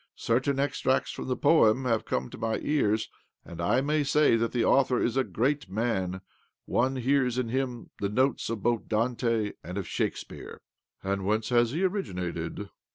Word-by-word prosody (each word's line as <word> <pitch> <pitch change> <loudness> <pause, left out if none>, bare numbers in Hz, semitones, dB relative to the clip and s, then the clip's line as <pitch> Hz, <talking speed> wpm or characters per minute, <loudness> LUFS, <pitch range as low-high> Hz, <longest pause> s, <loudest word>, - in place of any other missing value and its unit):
Certain 130 +4 0
extracts 135 -1 0
from - - -6
the 125 -1 -1
poem 130 -5 +4
have 115 -3 +1
come 65 0 -1
to - - -10
my 110 -1 0
ears, 110 -8 +1 0.4
and 85 - -8
I 105 +9 +2
may 150 +2 +1
say 150 -2 +4
that 115 0 0
the 120 -2 +1
author 130 -2 +3
is 120 - 0
a 135 - +3
greatman— 110 -8 -1 0.4
one 130 +3 +1
hears 130 -1 +1
in 125 -3 -1
him 125 -1 -3
the 100 - -1
notes 130 +5 +1
both 115 +1 0
of - - -25
Dante 115 -1 0
and 90 +3 -6
of 100 - -3
Shakespeare." - - -4 0.4
"And 100 0 -1
whence 110 +3 0
has 120 -1 +3
he 160 +9 -2
originated?" 90 - -3
120 Hz, 170 wpm, -28 LUFS, 105-135 Hz, 0.4 s, poem